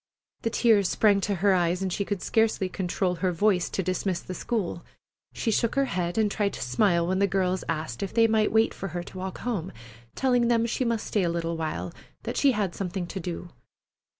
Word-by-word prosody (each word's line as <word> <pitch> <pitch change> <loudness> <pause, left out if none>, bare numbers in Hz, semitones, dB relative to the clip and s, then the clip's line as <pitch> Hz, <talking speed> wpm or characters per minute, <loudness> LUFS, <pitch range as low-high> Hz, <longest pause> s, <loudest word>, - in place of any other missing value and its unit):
The 230 - 0
tears 220 -5 +3
sprang 205 -2 +3
to 200 +1 0
her 200 - +6
eyes, 180 +1 +1
and 185 -2 -1
she 200 - -1
could 200 -3 -3
scarcely 220 -4 +2
control 180 -1 -1
her 185 -2 +2
voice 180 0 +2
to 190 - -2
dismiss 185 0 -1
the 185 - -7
school. 190 -4 -3 0.5
She 225 - -1
shook 230 +1 +1
her 275 0 +3
head 175 -6 -2
and 215 -2 +2
tried 200 -2 0
to - - -7
smile 170 - +2
when 185 +2 0
the 200 - +4
girls 185 -1 0
asked 155 -7 -3
if 195 - -3
they 230 0 +4
might 220 -1 +2
wait 220 +1 +3
for 195 - -5
her 175 - -3
to 185 - -11
walk 190 0 -5
home, 200 -8 -2 0.4
telling 245 -3 +2
them 230 -1 +3
she 235 +2 -1
must 230 -2 -1
stay 210 - 0
a 175 - +1
little 170 0 -2
while, 160 -1 -3 0.3
that - - -4
she 275 -2 +4
had 200 -5 -1
something 185 -1 -3
to 190 - -6
do. 175 0 -5
195 Hz, 220 wpm, -27 LUFS, 175-220 Hz, 0.5 s, her